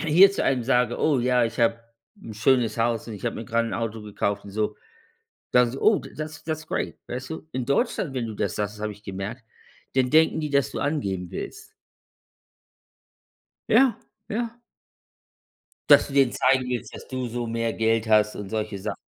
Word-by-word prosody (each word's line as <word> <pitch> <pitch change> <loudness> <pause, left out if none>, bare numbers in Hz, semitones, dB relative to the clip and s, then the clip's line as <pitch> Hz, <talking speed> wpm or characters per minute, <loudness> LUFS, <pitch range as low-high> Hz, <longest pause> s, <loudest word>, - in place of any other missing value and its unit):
hier 170 +5 +7
zu - - -1
einem 130 -3 +1
sage: 125 0 +2
„Oh 150 -4 +2
ja, 125 0 +3
ich 115 0 -4
habe 115 0 +3 0.4
‘n 110 - -8
schönes 120 +1 +2
Haus 115 -1 0
und 115 - -7
ich 105 - -10
habe 115 - -2
mir 115 - -5
gerade 115 +1 0
‘n - - -4
Auto 115 -1 -3
gekauft“ 100 -1 -2
und 100 - -9
so, 105 +1 -1 0.8
dann 125 -1 +4
so: 135 - -6
„Oh 215 -1 +5
t - - -11
that's 155 +1 -7
that's 155 -1 -4
great“, - - -2
weißt 130 +2 -5
du? 160 0 -7
In 130 -1 -2
Deutschland, 140 +2 0
wenn 125 -3 -2
du 110 - -5
das 100 -3 -2
sagst, 105 0 -2
das 105 - -11
habe 105 - -1
ich 105 0 -14
gemerkt, 100 +5 -6 0.5
dann 130 -1 +3
denken 160 +1 +4
die, 150 - -2
dass 140 -1 +1
du - - -4
angeben 100 - -2
willst. - - -7 2.0
Ja, 245 +2 +5 0.3
ja. 235 +2 -3 1.3
Dass - - +8
du 140 - -9
denen 135 -3 +4
zeigen 130 0 +2
willst, 125 -2 -4
dass - - -10
du 130 -1 -3
so 120 0 -3
mehr 115 0 -1
Geld 115 0 +1
hast 105 0 +4
und 100 -2 -7
solche 110 -2 -3
Sachen. 95 - -4
120 Hz, 200 wpm, -25 LUFS, 110-135 Hz, 2.0 s, Dass